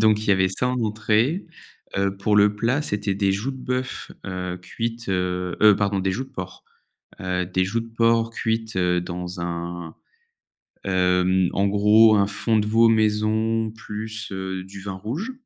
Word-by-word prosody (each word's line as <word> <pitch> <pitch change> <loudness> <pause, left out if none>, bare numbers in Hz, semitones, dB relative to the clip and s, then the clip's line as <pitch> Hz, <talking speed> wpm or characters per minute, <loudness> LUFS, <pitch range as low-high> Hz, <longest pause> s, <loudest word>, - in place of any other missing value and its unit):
Donc 110 -1 +4
il 110 - -5
y - - +5
avait 95 -1 +3
ça 110 +7 -1
en 125 0 -1
entrée. 110 - +1 0.5
Heu, 100 0 +1
pour 105 +2 +1
le 105 0 +5
plat 120 +6 +1
c'était 105 -6 -2
des 100 -1 +1
joues 105 +7 -2
de 130 - -7
bœuf, 125 0 -4 0.2
heu, 90 -1 -4
cuite 115 +2 -5
heu, 90 -1 -1
heu, 105 -2 +7
pardon 100 -1 0
des 95 0 0
joues 125 +8 -2
de 135 - -19
porc. 95 -9 -8 0.6
Heu, 90 -1 -1
des 95 +1 0
joues 100 +5 -1
de 115 - -8
porc 115 0 +3
cuites, 110 -2 -2
heu, 90 -1 +2
dans 90 0 -6
un, 85 -1 -5 0.9
hem, 90 -1 +2
en 100 - +1
gros 105 +2 +5
un 100 -1 +3
fond 110 +2 0
de 105 - 0
veau 115 +2 +5
maison 110 0 +1
plus, 110 0 -6
heu, 95 -1 -4
du 95 +1 -10
vin 100 -1 -5
rouge. 130 - -4
105 Hz, 180 wpm, -23 LUFS, 95-115 Hz, 0.9 s, heu